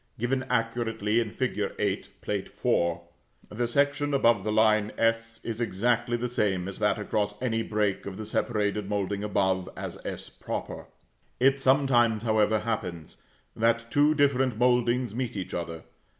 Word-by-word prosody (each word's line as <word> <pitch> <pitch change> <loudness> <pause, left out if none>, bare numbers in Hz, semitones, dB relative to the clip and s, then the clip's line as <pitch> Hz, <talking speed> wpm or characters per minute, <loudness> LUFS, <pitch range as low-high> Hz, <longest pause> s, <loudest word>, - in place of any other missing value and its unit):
given 125 +3 0
accurately 115 -2 0
in 115 -2 -1
fig. - - -2
8, - - -1
Plate - - -3
IV., 85 0 0 0.5
the 120 +1 0
section 145 +3 +1
across 115 -6 +4
the 105 - -1
line 110 -1 +3
s, 115 0 0
is 115 0 -4
exactly 120 +2 +1
the 120 +1 -2
same 95 -6 0
as 100 - -7
that - - +2
across 105 -1 -2
any 115 -3 0
break 105 -3 -1
of 95 -1 -6
the 110 - -5
separated 105 -2 -1
moulding 100 0 -1
above, 95 -3 0
as - - -6
[=s]. - - -6 1.1
It 135 +2 +3
sometimes, 125 -5 +3
however, 110 -1 +2
happens, 90 -8 -4 0.3
that 115 +1 +1
two 145 +2 +4
different 135 -5 +2
mouldings 125 -1 +2
meet 125 -1 -3
each 95 -2 -5
other. 85 -2 -4
115 Hz, 150 wpm, -27 LUFS, 105-120 Hz, 1.1 s, across